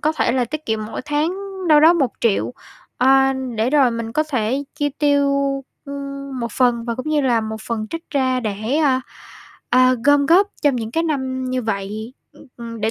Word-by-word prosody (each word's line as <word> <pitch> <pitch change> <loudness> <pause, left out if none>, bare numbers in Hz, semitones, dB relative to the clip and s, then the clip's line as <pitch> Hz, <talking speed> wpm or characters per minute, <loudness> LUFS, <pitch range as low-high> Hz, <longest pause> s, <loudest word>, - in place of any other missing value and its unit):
có 310 +1 +1
thể 235 - +1
là 255 -2 +1
tiết 310 +5 -6
kiệm 220 -1 -1
mỗi 220 - -6
tháng 300 +4 0 0.3
đâu 300 -1 +7
đó 325 +2 +7
1.000.000, 230 - 0 0.5
ờ, 270 +1 +4 0.2
để 225 +3 +1
rồi 275 -4 +4
mình 230 -1 -4
có 310 - +2
thể 265 -2 -1
chi 290 -1 0
tiêu, 285 -1 +3 0.6
ưm, 275 -1 -6
một 235 -2 -4
phần 240 -2 +2
và 235 -1 -2
cũng 255 +5 -5
như 305 -1 +2
là 245 -4 +2
một 220 0 -4
phần 220 -2 -3
trích 330 0 -7
ra 260 -3 +1
để, 215 +5 -2
a, 275 -5 +2 0.7
a, 255 +1 +5
gom 285 -1 +4
góp 380 +5 +5
trong 290 -4 +3
những 225 -2 -4
cái 325 +7 0
năm 265 -5 -2
như 255 0 -1
vậy, 215 +2 -4 0.2
ưm, 295 - -17
ừm, 230 -1 -8
để 220 +1 +1
260 Hz, 200 wpm, -20 LUFS, 230-290 Hz, 0.7 s, đâu